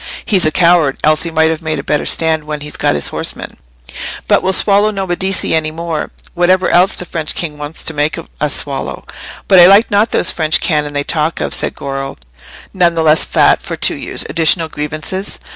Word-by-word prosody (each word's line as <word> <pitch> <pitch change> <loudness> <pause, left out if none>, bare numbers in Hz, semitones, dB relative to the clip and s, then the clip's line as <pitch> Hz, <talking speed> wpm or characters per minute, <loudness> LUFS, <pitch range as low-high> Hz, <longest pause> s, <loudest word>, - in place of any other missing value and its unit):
He's 190 -6 +3
a - - 0
coward, 170 -5 +3
else 155 0 +3
he 170 - -3
might 160 0 +2
have 160 0 -4
made 155 -1 -3
a 140 - -5
better 150 - -1
stand 160 -2 +2
when 150 -1 -5
he'd 150 0 -6
got - - +1
his 75 - -1
horsemen. - - -4 0.7
But - - +3
we'll 190 - 0
swallow 205 +2 +3
no 195 -2 -3
Medici 190 +1 0
any 160 -1 0
more, 165 0 -4 0.2
whatever 180 +1 +2
else 180 +2 +3
the 180 - -6
French 160 -3 -5
king 150 -4 -4
wants 150 +2 -5
to 160 - -3
make 150 +1 -1
us 150 -3 -4
swallow." 140 -2 -4 0.4
"But 190 - +6
I 175 - +9
like 200 +4 +5
not 205 +3 +2
those - - +2
French 155 -2 0
cannon 150 -3 -1
they 145 0 -1
talk 155 +2 -1
of," - - -2
said - - -2
Goro, 135 -1 -5 0.6
none 175 -3 +2
the 165 - 0
less 155 0 +4
fat - - +3
for - - -6
two - - +1
years' - - -3
additional 165 0 +1
grievances. 155 +7 -4
160 Hz, 210 wpm, -14 LUFS, 150-180 Hz, 0.7 s, I